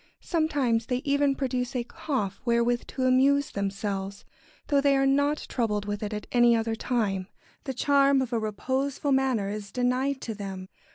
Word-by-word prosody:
Sometimes 280 - 0
they 250 0 -1
even 285 -1 +2
produce 255 -1 -2
a 245 - 0
cough 235 -5 -3
wherewith 240 0 +1
to 260 - -4
amuse 270 +2 +3
themselves, 200 0 -3 0.4
though 285 -2 +2
they 280 -1 +3
are 270 - +2
not 285 +2 +2
troubled 210 -4 -1
with 205 0 -3
it 210 -1 -3
at 210 0 -5
any 240 -1 +5
other 225 0 0
time. 215 -5 -1 0.4
The 265 -2 -4
charm 280 +1 +4
of 260 -2 -2
a 230 - +2
reposeful 260 +7 -2
manner 260 -7 +1
is 205 -1 -6
denied 255 +2 0
to 225 - -4
them. 195 -2 -7
250 Hz, 170 wpm, -27 LUFS, 210-275 Hz, 0.4 s, any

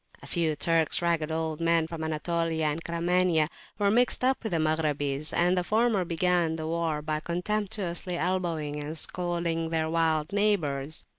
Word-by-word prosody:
A - - -9
few 165 -3 0
Turks, 165 +1 +1
ragged 165 -2 +1
old 160 0 -2
men 165 -1 +3
from 160 -1 -6
Anatolia 160 0 -1
and 155 +2 -1
Caramania, 170 -1 +2 0.3
were 200 -1 +2
mixed 245 +3 +2
up 260 0 +2
with 220 - -3
the 170 - +1
Maghrabis, 155 -2 +1
and 175 +2 +2
the 180 - +1
former 215 0 +2
began 170 -1 +1
the 160 -1 -4
war 160 -2 -1
by 155 0 -1
contemptuously 180 0 -2
elbowing 165 -5 -1
and 155 +2 -5
scolding 170 -2 -1
their 160 -1 -1
wild 160 +1 +1
neighbours. 160 -9 0
165 Hz, 160 wpm, -28 LUFS, 155-180 Hz, 0.3 s, men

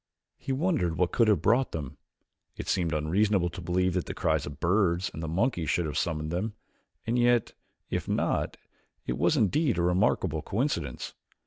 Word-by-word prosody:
He - - -4
wondered 130 - 0
what 90 -1 +1
could 115 - +3
have 100 -7 +3
brought 125 +5 +3
them. 75 -3 -5 0.6
It - - -6
seemed 85 -3 +1
unreasonable 90 +4 +1
to 90 - -8
believe 90 +1 +1
that 90 -1 -1
the - - -5
cries 80 -6 0
of 70 - -5
the - - -17
birds 90 0 +1
and 80 - -6
the 80 - -3
monkeys 85 - 0
should 85 0 +1
have 75 - -4
summoned 75 -2 -1
them, 105 +5 -2 0.5
and 120 +2 +1
yet, 120 -1 +3 0.4
if - - -2
not, - - 0 0.5
it 60 - -1
was - - +3
indeed 130 - +2
a 85 - +1
remarkable 90 -3 +1
coincidence. 95 - -2
90 Hz, 185 wpm, -28 LUFS, 80-110 Hz, 0.6 s, could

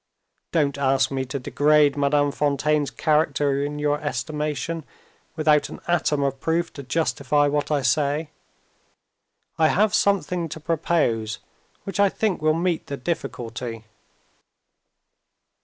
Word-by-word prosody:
Don't 140 -4 +1
ask 135 -1 +2
me 135 -1 -2
to 130 +2 -4
degrade 145 +2 +3
Madame 145 0 +2
Fontaine's 145 0 +1
character 145 -3 +1
in 145 +1 -3
your 150 0 0
estimation, 150 +4 -3 0.5
without 155 -2 +3
an - - -9
atom 155 -4 +1
of 135 -1 -1
proof 165 +3 -1
to 140 - -8
justify 145 0 +1
what 145 0 -1
I 145 -3 +1
say. 145 +4 +1 1.3
I 160 - +5
have 210 +5 +2
something 180 -5 +1
to 160 - -7
propose 150 -9 0 0.5
which 195 +1 -5
I 200 -1 +5
think 200 -4 -1
will 155 0 +3
meet 170 0 -1
the 140 - -4
difficulty." 120 -6 -4
150 Hz, 125 wpm, -23 LUFS, 140-160 Hz, 1.3 s, I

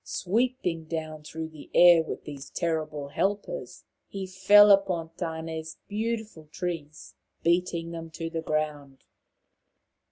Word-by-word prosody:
Sweeping 190 -5 -1
down 155 -1 -5
through 160 +1 -6
the 155 -2 -13
air 175 -1 +8
with 160 - -6
these 140 -2 -8
terrible 155 -4 -2
helpers, 205 - -2 0.2
he 195 -1 -5
fell 200 +3 +7
upon 185 -5 +3
Tane's 160 -1 -5
beautiful 215 -6 -3
trees, 165 -4 -5 0.3
beating 170 -1 +1
them 165 -1 -7
to 165 +1 -5
the 165 0 -3
ground. 150 -3 -3
165 Hz, 120 wpm, -27 LUFS, 155-190 Hz, 0.3 s, air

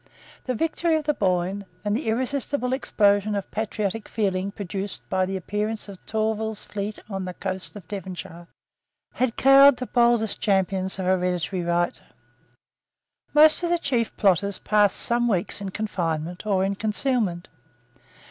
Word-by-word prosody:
The 255 - -1
victory 325 +4 +1
of 310 - 0
the 300 - +2
Boyne, 190 -2 0 0.2
and 205 0 +1
the 245 +1 -3
irresistible 255 +2 -1
explosion 205 -5 +2
of 200 - -4
patriotic 215 -1 -3
feeling 195 -3 -1
produced 200 0 -5
by 185 0 +1
the 190 0 -2
appearance 210 +4 -3
of 195 -2 -11
Tourville's 220 0 -1
fleet 205 +1 -5
on 195 -3 -4
the 180 -1 -6
coast 190 0 -4
of 195 -6 -10
Devonshire, 185 -3 -7 0.7
had 250 -2 0
cowed 275 0 +7
the 255 - -4
boldest 235 -3 +2
champions 190 -2 0
of 190 - -3
hereditary 180 0 0
right. 175 0 0 1.3
Most 310 +2 +7
of 345 - -1
the 345 - +3
chief 245 -8 -1
plotters 200 0 +2
passed 210 -2 +2
some 240 0 +1
weeks 195 -2 -1
in 200 - -4
confinement 175 -3 -3
or 190 -2 +2
in 195 - 0
concealment. 210 -3 -1
205 Hz, 150 wpm, -24 LUFS, 190-230 Hz, 1.3 s, cowed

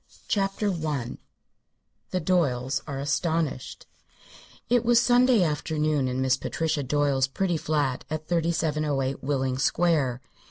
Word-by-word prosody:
CHAPTER 200 0 0
I 150 -7 -3 0.9
THE 185 - -1
DOYLES 140 -7 0
ARE 140 -2 -4
ASTONISHED 145 0 -2 0.8
It 240 -1 +3
was 240 0 +5
Sunday 245 -3 +4
afternoon 150 -2 0
in 130 +1 -2
Miss 130 0 +2
Patricia 160 +1 -2
Doyle's 140 -1 +1
pretty 175 +6 -1
flat 145 -5 -1
at 155 0 -4
3708 155 -5 0
Willing 130 -2 -1
Square. 135 -4 +1
150 Hz, 115 wpm, -26 LUFS, 135-170 Hz, 0.9 s, was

